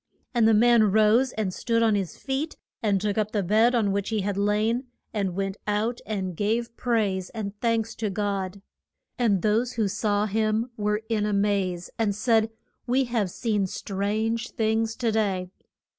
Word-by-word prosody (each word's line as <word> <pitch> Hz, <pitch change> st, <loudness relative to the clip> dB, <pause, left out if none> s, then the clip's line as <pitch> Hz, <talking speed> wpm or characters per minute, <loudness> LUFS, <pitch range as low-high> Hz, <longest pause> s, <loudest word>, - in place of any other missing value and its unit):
And 235 Hz, -3 st, +4 dB
the 225 Hz, -, +5 dB
man 230 Hz, -1 st, +5 dB
rose 220 Hz, +5 st, +4 dB
and 205 Hz, -4 st, -2 dB
stood 230 Hz, +3 st, +1 dB
on 225 Hz, -1 st, +4 dB
his 195 Hz, -4 st, -2 dB
feet, 280 Hz, +4 st, -3 dB, 0.2 s
and 205 Hz, -3 st, +2 dB
took 205 Hz, +1 st, -1 dB
up 215 Hz, 0 st, -1 dB
the 205 Hz, -2 st, +1 dB
bed 220 Hz, +6 st, +4 dB
on 215 Hz, -4 st, +2 dB
which 200 Hz, 0 st, -1 dB
he 220 Hz, -2 st, 0 dB
had 200 Hz, 0 st, -1 dB
lain 210 Hz, +5 st, +1 dB, 0.3 s
and 195 Hz, -5 st, -1 dB
went 195 Hz, +1 st, -2 dB
out 215 Hz, +3 st, 0 dB
and 190 Hz, -4 st, -3 dB
gave 230 Hz, +5 st, -1 dB
praise 210 Hz, -7 st, 0 dB
and 205 Hz, -2 st, -4 dB
thanks 230 Hz, -1 st, 0 dB
to 220 Hz, -2 st, -1 dB
God. 195 Hz, -1 st, -3 dB, 0.6 s
And 205 Hz, -7 st, +2 dB
those 230 Hz, +4 st, +1 dB
who 220 Hz, -4 st, +1 dB
saw 205 Hz, +1 st, 0 dB
him 220 Hz, +3 st, 0 dB
were 210 Hz, 0 st, -1 dB
in 215 Hz, -2 st, 0 dB
a 210 Hz, -, 0 dB
maze 200 Hz, -3 st, 0 dB
and 210 Hz, -3 st, +1 dB
said, 225 Hz, 0 st, +2 dB, 0.4 s
We 260 Hz, +2 st, +3 dB
have 235 Hz, -6 st, -1 dB
seen 205 Hz, 0 st, -1 dB
strange 215 Hz, +5 st, -2 dB
things 220 Hz, 0 st, 0 dB
to 235 Hz, -3 st, 0 dB
day. 195 Hz, -4 st, 0 dB
215 Hz, 175 wpm, -26 LUFS, 200-230 Hz, 0.6 s, the